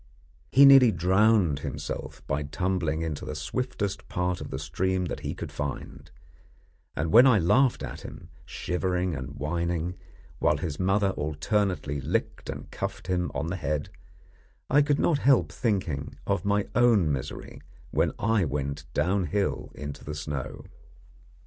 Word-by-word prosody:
He 140 +2 +8
nearly 135 -4 +8
drowned 95 -2 +3
himself - - -6
by 70 +2 -1
tumbling 80 0 -1
into 80 -3 -4
the - - -5
swiftest 100 - -3
part 90 0 -1
of - - -6
the 65 - -4
stream 90 +6 -1
that 85 - -4
he - - -4
could - - -6
find, 70 -2 -6 0.9
and 80 +2 -1
when 120 +4 +8
I 125 -4 +6
laughed 120 - +3
at - - -6
him, - - -10
shivering 90 0 -2
and 70 0 -6
whining, 85 +3 -2 0.5
while 75 - +3
his 75 -1 -4
mother 95 +1 +2
alternately 75 0 -1
licked - - -2
and - - -7
cuffed - - -5
him 90 -1 -1
on 70 +4 -1
the 85 +3 -3
head, 75 -2 -2 0.8
I 145 +2 +6
could 145 0 +2
not 155 -2 +2
help 120 - +4
thinking 85 - -2
of 100 0 -1
my 100 0 +1
own 115 -10 +4
misery 65 -3 -5 0.3
when - - +2
I 110 -2 +2
went 70 -1 -3
downhill 95 +3 0
into 75 -1 -7
the 75 - -5
snow. 70 -2 -5
90 Hz, 150 wpm, -27 LUFS, 75-100 Hz, 0.9 s, He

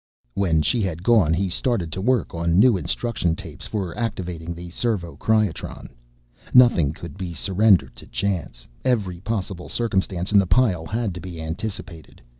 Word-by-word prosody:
When 80 -4 +2
she 120 +6 +1
had 90 -4 -3
gone 105 -8 +4
he 95 +4 +1
started 90 -2 -1
to 95 - -4
work 120 -1 +1
on 85 0 +1
new 115 +2 +6
instruction 95 -3 -1
tapes 80 -6 -8
for 95 -6 -3
activating 90 -7 -4
the 85 0 -9
servo 95 -5 -2
cryotron. 110 -5 -1 0.7
Nothing 120 - +6
could 85 +5 -10
be 90 -3 -5
surrendered 100 +2 +3
to - - -12
chance. 85 -11 -3 0.2
Every 105 -9 0
possible 95 -3 -4
circumstance 95 -5 -1
in 105 - +6
the 95 - +2
pile 90 -5 +2
had 110 -3 -2
to 90 - -7
be 85 -1 -8
anticipated. 85 0 -6
95 Hz, 160 wpm, -23 LUFS, 85-110 Hz, 0.7 s, new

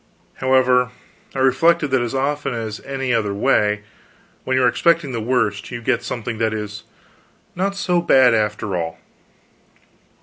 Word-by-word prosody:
However, 130 -1 +3 0.5
I - - -4
reflected 165 +4 +3
that 130 -2 +2
as 120 +2 -3
often 140 -1 -1
as 110 -2 -5
any 135 -2 -3
other 105 -3 0
way, 105 -3 +2 0.6
when 130 0 +1
you 130 - +3
are - - +5
expecting 165 +3 +2
the 115 -2 -3
worst, 110 -4 -1
you 120 - -5
get 120 0 0
something 115 -2 -5
that 110 -1 0
is 105 -1 -6 0.7
not 195 +2 -1
so 180 -3 +1
bad, 130 -7 +5
after 105 -2 -1
all. 80 -1 -3
125 Hz, 155 wpm, -20 LUFS, 110-135 Hz, 0.7 s, are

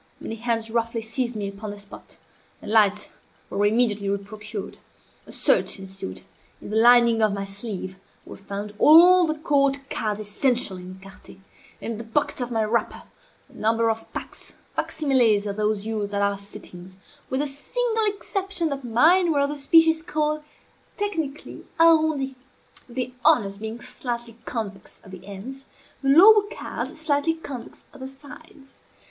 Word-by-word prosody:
Many - - -6
hands 225 -1 -1
roughly 230 0 -1
seized 235 +2 -3
me 205 -2 -3
upon 200 +2 -7
the 205 - -7
spot, 200 0 -12 0.4
and - - -8
lights 210 -2 +3 0.4
were 200 - 0
immediately 210 -3 +2
re 200 - +1
procured. 210 +1 -8 0.5
A - - -11
search - - +2
ensued. 190 - -8 0.4
In - - -10
the - - -2
lining 235 0 +5
of 215 -2 +3
my 200 0 -3
sleeve 195 -2 -6 0.3
were - - -10
found 200 +1 -7
all 350 +3 +7
the 310 0 -2
court 280 -2 +2
cards 210 -1 -2
essential 215 0 0
in 180 +1 -9
écarté, 195 0 -14 0.4
and, - - -5
in 225 - -5
the - - -6
pockets 255 +4 -1
of 245 - -2
my 225 -2 0
wrapper, 225 +2 -1 0.4
a - - -23
number 225 +1 +1
of 225 0 -7
packs, - - -8 0.2
facsimiles 250 -9 +2
of 200 -1 -3
those 210 -1 -1
used 210 -2 -3
at 200 - 0
our 200 -1 0
sittings, 190 -2 -12 0.3
with 260 +2 0
the - - 0
single 445 - -1
exception 390 -4 -1
that 275 -1 -5
mine 325 +10 +4
were 285 -2 +2
of 280 - +1
the 295 - -4
species 320 +3 +4
called, 305 -1 -1 0.6
technically, 325 -9 -4 0.2
arrondis; 315 -5 +4 0.6
the 250 +1 -4
honors 205 -11 +3
being 220 +2 -6
slightly 240 -2 -6
convex 210 -5 -6
at 190 - -14
the 185 -1 -11
ends, 255 +8 -9 0.3
the 270 - 0
lower 410 +9 +8
cards 270 +7 -6
slightly 310 +1 0
convex 275 -7 -9
at 290 - -14
the 260 - -6
sides. 285 +1 -15
235 Hz, 165 wpm, -24 LUFS, 205-290 Hz, 0.6 s, lower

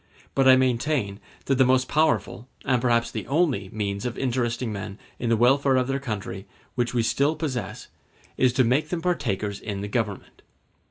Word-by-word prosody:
But 135 -1 +3
I 130 - +9
maintain 125 -4 0 0.3
that 135 -1 +1
the - - +7
most 130 0 +3
powerful, 150 -5 0 0.2
and 130 -3 +2
perhaps 120 -1 +2
the - - -5
only, 140 - +1
means 100 -1 -3
of 120 -2 -4
interesting 120 -2 -1
men 100 0 -6 0.2
in 120 - -1
the 115 - +3
welfare 135 +3 +4
of 130 0 +2
their 135 0 -1
country 105 -6 -5 0.3
which 120 -1 -1
we 120 - +2
still 140 +6 +1
possess 125 - -4 0.5
is 130 -1 +3
to 130 - +3
make 135 +6 +1
them 165 -1 -3
partakers 105 - -1
in 100 -2 -5
the 100 - -4
Government. 105 -2 -3
125 Hz, 180 wpm, -25 LUFS, 110-135 Hz, 0.5 s, I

